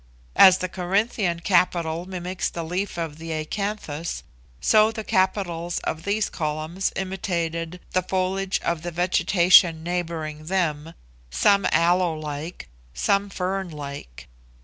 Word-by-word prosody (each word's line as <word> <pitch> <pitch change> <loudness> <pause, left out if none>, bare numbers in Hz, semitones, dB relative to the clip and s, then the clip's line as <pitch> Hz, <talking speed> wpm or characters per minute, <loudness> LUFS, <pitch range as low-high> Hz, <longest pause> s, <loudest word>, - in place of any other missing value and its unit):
As 185 -1 +8
the 185 - -2
Corinthian 185 -1 -1
capital 175 -3 +1
mimics 185 0 -3
the 170 - -5
leaf 180 +3 -3
of 160 -2 -4
the 165 0 -6
acanthus, 165 -1 -4 0.4
so 215 0 +4
the 220 -1 -6
capitals 185 -4 0
of 160 - -4
these 205 +1 +1
columns 155 +4 -2
imitated 175 -3 -3
the 185 - +2
foliage 190 +1 -1
of 170 -2 -1
the 175 - -4
vegetation 175 -1 +4
neighbouring 165 -3 -3
them, 165 -4 -1 0.3
some 195 - +3
aloe 175 0 +3
like, 155 +2 -6 0.3
some 200 - +1
fern 190 0 -3
like. 140 - -8
175 Hz, 125 wpm, -24 LUFS, 160-190 Hz, 0.4 s, As